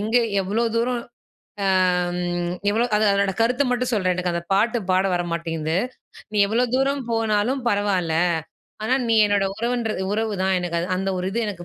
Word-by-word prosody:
எங்க 220 +3 0 0.3
எவ்வளோ 215 +5 0
தூரம் 240 +1 0 1.7
எவ்ளோ 225 +3 +2
அம் 245 - -10
அது 215 - +2
அதோட 200 0 +2
கருத்த 250 +4 +3
மட்டும் 250 0 0
சொல்றேன் 185 -4 +1
எனக்கு 180 -1 -1
அந்த 170 0 -2
பாட்டு 225 +5 +2
பாட 185 +1 +3
வர 175 - 0
மாட்டேங்குது. 165 0 -2 0.5
நீ - - -3
எவ்வளோ 230 +4 +1
தூரம் 270 0 0
போனாலும் 225 +3 0
பரவால்ல 195 -5 0 0.7
ஆனா 250 - +2
நீ 230 - +3
என்னோட 205 -1 +2
உறவுன்றது, 235 -3 -1
உறவு 220 0 -1
தான் 190 0 +2
எனக்கு 175 -1 -3
அது 170 - -2
அந்த 195 +1 -1
ஒரு 180 - -2
இது 220 - -2
எனக்கு 185 -4 -6
205 Hz, 170 wpm, -23 LUFS, 185-235 Hz, 1.7 s, கருத்த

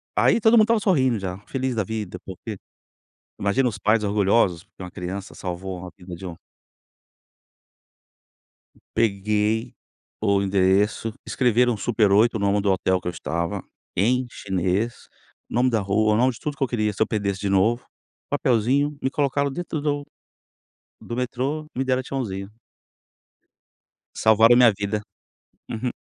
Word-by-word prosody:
aí - - +4
todo 220 +2 +4
mundo 220 -2 +7
estava 230 -1 +2
sorrindo 130 - +2
já, 95 0 -5
feliz 130 -1 -2
da 110 -3 0
vida 105 -3 -5
porque, 100 +3 -7 0.8
imagina 115 +6 +1
os 110 -4 -3
pais 105 +2 +2
orgulhosos 100 -3 +2
porque 95 - -18
uma 90 - -7
criança 95 +2 -6
salvou 90 0 -5
a - - -7
vida 90 -1 -9
de 95 - -10
um 85 - -5 2.6
Peguei 105 +1 0 0.5
o 100 -2 +2
endereço, 100 +3 +2
escreveram 125 -2 +2
Super 110 -2 +1
8 115 +4 +4
o - - -2
nome 100 0 +2
do 100 - +2
hotel 95 0 +1
que 90 - -4
eu - - -2
estava, 85 +1 -3 0.3
em 125 +6 +2
chinês, 95 +4 -2 0.4
o - - -8
nome 125 +1 +3
da 110 -2 +1
rua, 105 +2 +2
o - - +2
nome 125 +2 +3
de 115 - -13
tudo 145 -2 -4
que 135 - 0
eu - - -3
queria, 110 -3 0
se 100 - -1
eu - - +3
perdesse 100 -3 -2
de 100 - -1
novo, 110 +5 +2 0.5
papelzinho, 140 +2 +1
me 130 - 0
colocaram 140 0 0
dentro 165 -1 -4
do 145 -1 -1 1.0
do 120 - -5
metrô, 130 +5 -2
me 130 - +1
deram 130 0 +1
tchauzinho. 100 -8 -4 1.7
Salvaram 110 +2 +5
a - - +4
minha 120 -3 +7
vida, 100 +1 -2 0.7
uhum. 120 +3 -2
110 Hz, 155 wpm, -23 LUFS, 95-125 Hz, 2.6 s, mundo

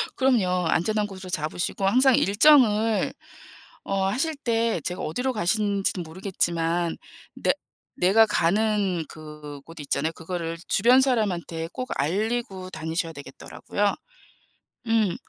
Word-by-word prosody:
그럼요. 190 -9 +2
안전한 210 +6 +1
곳으로 190 -2 -9
잡으시고 175 +3 -2
항상 255 +6 +5
일정을 220 -1 +4 0.7
어 195 -1 -1
하실 270 +11 0
때 230 -6 0
제가 180 +4 -3
어디로 250 +12 -2
가시는지는 200 -2 0
모르겠지만 170 -1 -1 0.4
내 - - +1 0.4
내가 200 +5 +5
가는 200 -1 +1
그 150 -2 -10
곳 165 0 -12
있잖아요. 145 +2 -1
그거를 165 0 -5
주변 245 +6 +5
사람한테 185 -10 -1
꼭 255 0 -5
알리고 195 - -2
다니셔야 165 0 -3
되겠더라고요. 160 +8 -3 0.9
음. 220 -5 +2
195 Hz, 285 characters per minute, -25 LUFS, 165-225 Hz, 0.9 s, 항상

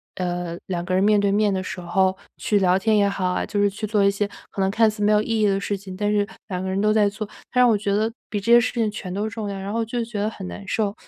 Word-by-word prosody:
呃， 175 -2 -3
两 175 -2 -3
个 185 +1 -3
人 185 - +3
面 210 +1 +4
对 200 -1 +2
面 205 0 +2
的 190 0 -2
时 185 - -6
候 190 +2 +1 0.2
去 210 - +1
聊 185 -1 +3
天 215 +2 +2
也 200 -1 +4
好 200 -2 -2
啊， 180 - -1
就 205 - -1
是 205 - +4
去 215 +2 -5
做 210 -1 +2
一 200 - +4
些 200 +1 -1 0.2
可 195 - -3
能 190 - +2
看 220 +2 +3
似 210 0 -8
没 210 +1 +4
有 210 - +4
意 225 +1 -1
义 - - +4
的 195 -1 +2
事 200 0 -2
情， 190 -1 -9
但 205 +2 0
是 205 -1 +1 0.2
两 180 -2 -3
个 190 - -3
人 190 +1 0
都 215 - +3
在 215 -1 +4
做， 215 +1 -5 0.2
他 250 - +2
让 250 - +6
我 220 - +4
觉 200 -1 -1
得 220 +2 +1 0.2
比 205 -3 -2
这 230 - 0
些 240 - +9
事 230 - -1
情 225 -3 0
全 185 -3 -6
都 210 +3 -2
重 210 -1 -5
要， 200 - -4
然 195 +1 -5
后 230 - 0
我 225 - 0
就 235 +1 -2
觉 225 -2 -5
得 210 +1 0
很 195 -3 -8
难 200 - -9
受。 205 0 0
205 Hz, 345 characters per minute, -23 LUFS, 190-215 Hz, 0.2 s, 些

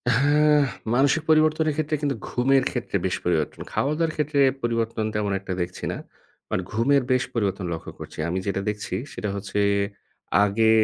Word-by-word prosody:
হ্যাঁ, 150 +3 +4 0.4
মানসিক 140 +5 +3
পরিবর্তনের 155 0 +4
ক্ষেত্রে 155 0 0
কিন্তু 140 -2 0
ঘুমের 135 +2 +3
ক্ষেত্রে - - -4
বেশ - - 0
পরিবর্তন। 80 -4 0
খাওয়া-দাওয়ার 155 +3 0
ক্ষেত্রে 150 -1 0 0.2
পরিবর্তন 115 -2 0
তেমন 105 -1 0
একটা 95 -1 -5
দেখছি 90 +1 -5
না। - - -4 0.5
বাট - - 0
ঘুমের 130 +5 +3
বেশ 130 0 +3
পরিবর্তন 100 -4 -1
লক্ষ্য 80 - -6
করছি। - - -9
আমি 90 - -1
যেটা 100 0 0
দেখছি 105 0 -4 0.2
সেটা 105 - -3
হচ্ছে 100 +1 -3 0.8
আগে 110 +2 +3
125 Hz, 155 wpm, -24 LUFS, 105-150 Hz, 0.8 s, হ্যাঁ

